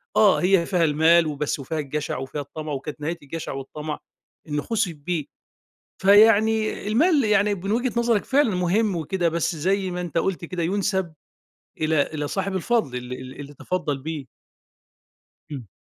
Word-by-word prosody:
آه، 210 -3 +6
هي 180 -1 +3
فيها 180 -1 +1
المال 160 +2 +4
وبس 150 0 -2
وفيها 155 +4 -4
الجشع 150 -1 -3
وفيها 135 +3 -5
الطمع 155 +2 -7
وكانت 145 +2 -6
نهاية 165 +3 -2
الجشع 160 +3 -6
والطمع 150 +3 -6 0.5
إنه 150 -1 -1
خُسف 215 -1 -1
بيه. 155 0 -3 0.7
فيعني 215 +2 +4
المال 285 - +3
يعني 210 -1 +3
من 195 +2 -4
وجهة 245 +2 +1
نظرك 235 -3 +1
فعلًا 270 -7 +2
مهم 185 +3 +1
وكده 170 +2 0
بس 170 +1 -1
زي 190 +4 0
ما 180 - -3
أنت 170 -2 -4
قُلت 175 -1 -1
كده 175 0 -3
يُنسب 190 -2 -1 0.7
إلى 155 -1 +3
إلى 150 -1 -2
صاحب 195 +2 -2
الفضل، 190 - 0
ال 125 0 -6
ال 130 +2 -9
اللي 145 +1 -10
تفضّل 155 -1 -2
بيه. 150 0 -5 1.3
إمم، 130 -7 -6
170 Hz, 160 wpm, -24 LUFS, 150-200 Hz, 1.3 s, آه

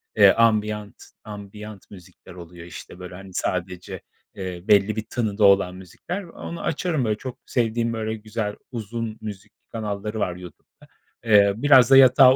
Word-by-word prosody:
eee, - - +8
ambient, 105 -2 +1 0.3
ambient 105 0 -10
müzikler 90 -3 -14
oluyor 85 -1 -11
işte 90 +1 -11
böyle, 90 0 -9
hani, 95 0 -11
sadece, 90 +1 -3 0.3
eee, 90 -2 -6
belli 105 +1 +4
bir 110 - -3
tınıda 110 -3 -1
olan 100 -2 +4
müzikler. 95 - -7
Onu 170 0 -8
açarım 155 -4 -1
böyle 105 -1 0
çok 130 +1 -7
sevdiğim, 115 -1 0
böyle 110 0 -3
güzel, 105 -1 -4 0.2
uzun 115 -1 -5
müzik 105 -3 -8 0.2
kanalları 105 -1 -4
var 90 -4 -1
YouTube'da. 90 -1 -14 0.4
Eee, 100 -1 +6
biraz 130 -2 +6
da 135 - +9
yatağa 130 0 +8
105 Hz, 150 wpm, -23 LUFS, 95-115 Hz, 0.4 s, da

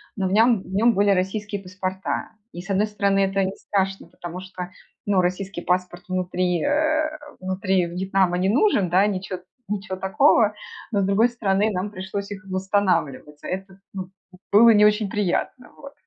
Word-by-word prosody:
но 190 -2 -1
в - - -3
нём 225 0 +4
в - - -16
нём 230 +4 +4
были 200 +1 +3
российские 200 +2 -1
паспорта. 185 +1 -4 0.2
И 175 - -6
с 195 - -14
одной 200 +2 +2
стороны 200 -1 +1
это 195 0 +2
не 190 +1 -2
страшно, 195 -1 -2
потому 175 +1 -8
что, 185 -1 -8 0.3
ну, 195 -3 +3
российский 185 0 -2
паспорт 180 0 -1
внутри, 180 -2 -1
э, 310 +1 +2 0.3
внутри 185 0 0
Вьетнама 180 +1 0
не 190 +2 +1
нужен, 225 - +3
да, 190 +3 +4
ничё 185 -2 -3 0.3
ничё 195 -2 -3
такого, 210 +2 +3 0.4
но, 205 -3 +1
с - - +1
другой 205 +5 +4
стороны, 210 -3 +1
нам 190 +2 -2
пришлось 200 +1 -5
их 190 -2 -8
восстанавливать. 185 -7 -1
А - - -6
это, 190 +1 -6
ну, 185 -1 -6 0.4
было 225 +3 +7
не 210 0 +6
очень 210 -1 +2
приятно. 210 +5 -2
Вот. 280 0 -12
195 Hz, 170 wpm, -23 LUFS, 185-205 Hz, 0.4 s, было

